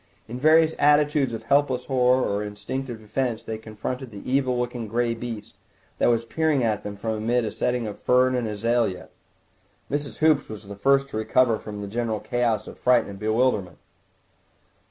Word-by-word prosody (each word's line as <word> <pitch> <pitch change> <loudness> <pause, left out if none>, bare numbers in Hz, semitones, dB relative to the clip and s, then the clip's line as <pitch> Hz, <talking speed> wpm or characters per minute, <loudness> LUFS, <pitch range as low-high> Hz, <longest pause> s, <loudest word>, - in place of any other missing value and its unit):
In 120 +3 -6
various 160 +2 +5
attitudes 145 -1 +3
of 115 -1 -5
helpless 130 0 +1
horror 130 -1 +3
or 100 +1 -1
instinctive 110 +5 -5
defence 115 +2 -2
they 110 -1 -5
confronted 110 +4 -5
the 100 -3 -10
evil 130 -1 +1
looking 120 -2 -3
grey 115 +2 0
beast 115 -2 -7 0.5
that - - +4
was 115 -1 +1
peering 155 +1 +1
at 110 -3 0
them 105 0 -6
from 110 +3 -3
amid 115 +2 0
a - - -3
setting 125 -1 -1
of 105 -2 -6
fern 130 +1 +3
and 125 -3 -1
azalea. 110 -2 -1 0.8
Mrs. 145 0 -3
Hoops 155 -3 +3
was 110 -1 -8
the 100 - -7
first 135 +6 +2
to 110 - -5
recover 110 +1 +2
from 105 -1 -7
the - - -5
general 110 0 -2
chaos 115 -3 0
of - - -11
fright 125 -1 +4
and 100 -1 -9
bewilderment. 110 -4 0
120 Hz, 175 wpm, -24 LUFS, 110-130 Hz, 0.8 s, various